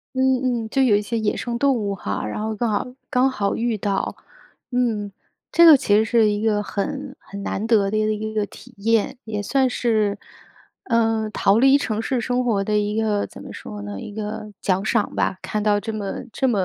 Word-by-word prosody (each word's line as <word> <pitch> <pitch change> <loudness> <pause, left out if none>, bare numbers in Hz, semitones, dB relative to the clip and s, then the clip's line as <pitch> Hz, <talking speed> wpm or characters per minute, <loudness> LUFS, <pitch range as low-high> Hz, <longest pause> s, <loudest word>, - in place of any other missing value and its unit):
嗯 255 -2 +1
嗯， 220 - -6
就 270 - +2
有 225 -6 +5
一 210 - 0
些 230 +3 -3
野 210 -1 0
生 240 -1 -3
动 275 +1 +2
物 205 -3 -2
哈， 100 - -3
然 105 - -4
后 220 0 -2
刚 235 +1 0
好 205 +4 0 0.2
刚 255 +2 +3
好 200 -6 -1
遇 230 -2 -1
到。 200 -1 -1 0.6
嗯， 220 -5 0 0.4
这 340 - +6
个 320 -3 +10
其 250 -6 +1
实 220 - +4
是 220 -1 +3
一 205 0 -2
个 210 -2 +2
很 200 -1 -4
很 200 0 -9
难 200 - -2
得 215 -4 +3
的 215 - -1
一 215 - +2
个 215 - +1
一 215 +1 -4
个 215 - +1
体 250 +4 -15
验， 225 +4 +1
也 210 -2 -3
算 265 +4 +2
是， 215 -5 +1 0.7
呃， 225 -2 +1
逃 200 0 +3
离 270 +2 +6
城 220 -4 -2
市 255 +1 -1
生 250 +2 0
活 215 -5 +1
的 210 +1 0
一 210 +1 0
个 210 -2 +1
怎 - - -13
么 - - -9
说 105 0 -8
呢？ 100 -1 -6
一 205 - -8
个 210 0 -5
奖 190 +1 0
赏 215 - 0
吧。 190 - 0
看 210 -1 -2
到 210 -1 +3
这 220 +2 -4
么 205 -2 -4
这 265 - +1
么 225 -5 +1
215 Hz, 240 characters per minute, -22 LUFS, 205-240 Hz, 0.7 s, 个